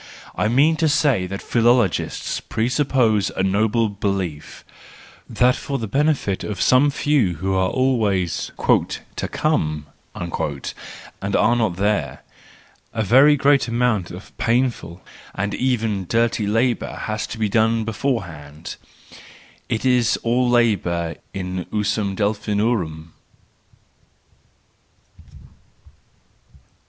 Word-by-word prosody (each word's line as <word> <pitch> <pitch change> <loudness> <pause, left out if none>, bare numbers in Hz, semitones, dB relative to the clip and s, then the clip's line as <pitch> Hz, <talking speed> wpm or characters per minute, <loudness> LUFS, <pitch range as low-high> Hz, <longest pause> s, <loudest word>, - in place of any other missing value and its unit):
I - - 0
mean 145 +8 +3
to 160 -1 +2
say 145 -10 +2
that 100 +1 -6
philology 120 -4 +2 0.4
presupposes 120 -3 +1
a 95 - +1
noble 110 +4 +2
belief,— 100 -6 -4 0.6
that 125 +1 +3
for 140 - -4
the 115 - -4
benefit 135 -4 0
of 105 -3 -5
some 130 +3 +4
few 140 - +1
who 95 +5 -2
are 95 -1 +1
always 105 - 0 0.3
" - - -9
to - - -2
come," 75 -1 -1 0.3
and 85 +4 -5
are 120 - +3
not 110 -7 0
there, 95 -9 -1 0.7
a 110 - -1
very 135 +8 +6
great 140 -1 +3
amount 115 -6 0
of 90 +3 -11
painful, 115 -8 -1 0.3
and 100 +1 -2
even 110 -7 -1
dirty 115 -2 +1
labour 115 +3 0
has 110 0 -3
to - - -7
be 110 -1 0
done 110 +2 +2
beforehand: 85 - -4 0.9
it 115 +2 -2
is 125 -3 +3
all 120 +2 +2
labour 90 -9 +1
in 90 -1 -4
usum 105 -1 -1
Delphinorum 100 -6 -1
110 Hz, 110 wpm, -21 LUFS, 95-125 Hz, 0.9 s, very